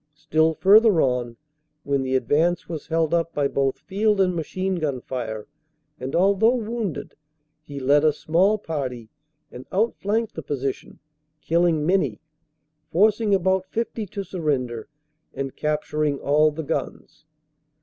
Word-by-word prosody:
Still 155 +1 +1
further 205 0 +6
on, 125 -4 0 0.5
when 140 -1 0
the 130 0 -1
advance 155 +8 +1
was 160 -3 -6
held 165 0 0
up 165 -1 0
by 145 -1 +2
both 135 -1 0
field 205 +1 0
and 185 -2 +2
machine 185 +3 -2
gun 145 -5 -2
fire, 115 -4 -5 0.5
and 130 +1 -4
although 200 +6 +4
wounded, 225 -5 -4 0.5
he 145 -2 -8
led 140 +3 +3
a 155 - +5
small 180 +8 +2
party 130 - -5 0.4
and 125 - -10
outflanked 220 +1 0
the 160 - -6
position, 135 -2 -4 0.4
killing 165 +1 +1
many, 155 - +1 0.7
forcing 210 +2 +3
about 190 0 +1
50 225 0 -3
to 200 +2 -5
surrender 140 - -2 0.5
and 135 -1 -4
capturing 150 -1 -1
all 150 +3 +3
the 155 +2 -6
guns. 150 - -5
160 Hz, 135 wpm, -23 LUFS, 140-190 Hz, 0.7 s, further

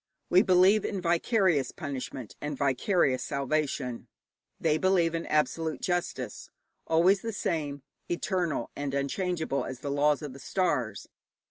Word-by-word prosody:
We 180 - +7
believe 190 +3 +5
in 200 - -2
vicarious 175 - +2
punishment 135 -6 -6
and 145 -1 -3
vicarious 135 - +2
salvation; 140 -3 -2 0.5
they 155 -1 +2
believe 180 -3 +3
in 165 0 -3
absolute 155 +1 0
justice 170 - -3 0.4
always 180 +4 +4
the 230 - -3
same, 145 -8 -2 0.3
eternal 175 -2 -1
and 140 -1 -3
unchangeable 160 +1 -1
as 130 -1 -7
the 140 - -3
laws 145 +1 +2
of 145 -3 -6
the 135 - -11
stars. 130 - -1
155 Hz, 130 wpm, -29 LUFS, 140-180 Hz, 0.5 s, We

